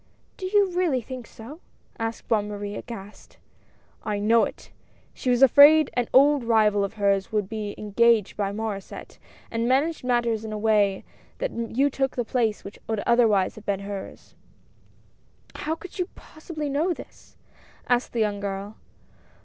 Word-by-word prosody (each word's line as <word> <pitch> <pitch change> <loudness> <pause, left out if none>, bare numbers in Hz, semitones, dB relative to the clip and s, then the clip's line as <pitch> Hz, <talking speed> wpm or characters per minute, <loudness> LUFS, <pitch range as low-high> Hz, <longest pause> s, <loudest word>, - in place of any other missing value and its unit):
"Do 375 - -5
you 400 -1 +3
really 350 -8 +1
think 255 +1 -8
so?" 260 +9 -11 0.4
asked 225 0 -4
Bonne 210 -2 +1
Marie, 205 0 -5
aghast. 205 -2 -10 0.7
"I 210 -1 -2
know 225 +3 +3
it! - - -10 0.4
She 255 - -3
was 250 +1 +4
afraid 290 +3 +7
an 245 -2 0
old 280 0 +5
rival 215 -3 +3
of 200 - -4
hers 200 -2 +1
would 210 -3 0
be 210 -1 -5
engaged 215 0 +2
by 200 -1 -1
Mauresset, 205 -2 -6 0.3
and 230 +1 -1
managed 285 +5 +1
matters 240 -3 0
in 220 - -6
such 215 - -4
a - - -3
way 210 -2 +2 0.3
that - - -2
you 240 +5 0
took 270 0 -1
the 245 - -1
place 225 -3 -1
which 200 - -10
would 220 -2 -2
otherwise 225 -6 +3
have 215 - -14
been 200 -1 -1
hers." 200 -1 -8 0.6
" - - -32
How 320 - 0
can 365 +2 -11
you 360 0 -3
possibly 310 -1 -7
know 305 +6 0
this? - - -14 0.2
" - - -28
asked 245 0 +1
the 235 - 0
young 205 -1 0
girl. 200 +1 -5
230 Hz, 170 wpm, -25 LUFS, 205-270 Hz, 0.7 s, afraid